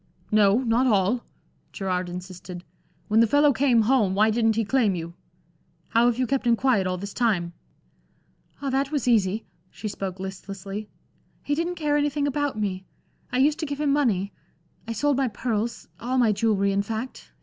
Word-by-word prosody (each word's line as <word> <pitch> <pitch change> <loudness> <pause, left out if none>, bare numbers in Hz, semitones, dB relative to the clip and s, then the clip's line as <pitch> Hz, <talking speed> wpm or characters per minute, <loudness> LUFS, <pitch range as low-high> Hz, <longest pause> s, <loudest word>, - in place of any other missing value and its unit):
"No, 210 +3 +4
not 240 +2 +2
all." 210 +2 +2 0.5
Gerard 185 -2 -2
insisted. 180 0 -8 0.4
"When 215 +1 +3
the 230 - +5
fellow 290 +4 +4
came 255 -5 +3
home, 215 -5 +2
why 215 +2 +4
didn't 225 -1 +2
he 225 0 0
claim 220 -5 +2
you? 170 0 -6 0.8
How 235 +1 +4
have 240 -1 +1
you 255 - +1
kept 265 0 -1
him 235 - +5
quiet, 230 -6 +2
all 185 0 -1
this 200 +2 -7
time?" 190 -8 0 1.1
"Ah, 275 - -1
that 275 +2 0
was 285 -6 -1
easy." 215 -2 +2 0.2
She 215 - -7
spoke 195 -2 -5
listlessly. 195 +2 -7 0.5
"He 290 - -1
didn't 340 +4 -1
care 295 -3 0
anything 290 0 0
about 285 -4 -1
me; 190 -3 -2 0.5
I - - -1
used 295 +4 +3
to 315 - -2
give 285 0 -4
him 290 -2 +2
money. 210 -9 +1 0.5
I 230 - -2
sold 280 +5 +1
my 270 -1 +2
pearls 230 0 -3
all 255 +2 -2
my 235 -4 +4
jewelry, 200 -2 +1
in 200 0 +1
fact. 225 +5 -6
225 Hz, 180 wpm, -25 LUFS, 195-265 Hz, 1.1 s, the